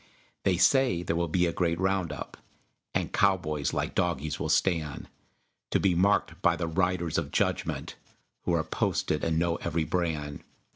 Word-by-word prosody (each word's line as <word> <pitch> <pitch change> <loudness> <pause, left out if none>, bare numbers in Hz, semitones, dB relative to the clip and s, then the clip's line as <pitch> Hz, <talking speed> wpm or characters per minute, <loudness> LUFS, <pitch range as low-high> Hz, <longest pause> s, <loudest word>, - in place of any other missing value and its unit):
They 95 -2 +3
say 125 -5 +3
there 85 -1 -1
will 85 0 0
be 90 +3 +2
a 85 - -1
great 85 -1 0
round 95 -3 0
up, 75 - -7 0.6
And - - -1
cowboys, 85 -7 +1
like - - -2
dogies, 80 -4 -1
will - - -2
stand, 80 -6 0 0.6
To - - +2
be 95 -2 +3
marked 95 -1 +2
by 85 -3 +4
the 85 - -2
Riders 85 -1 0
of - - -4
Judgment - - -1 0.5
Who 85 - +1
are 80 - +1
posted 75 - -1
and 80 -1 +1
know 85 0 +1
every 85 -1 -1
brand. 80 -3 -2
85 Hz, 165 wpm, -28 LUFS, 80-90 Hz, 0.6 s, by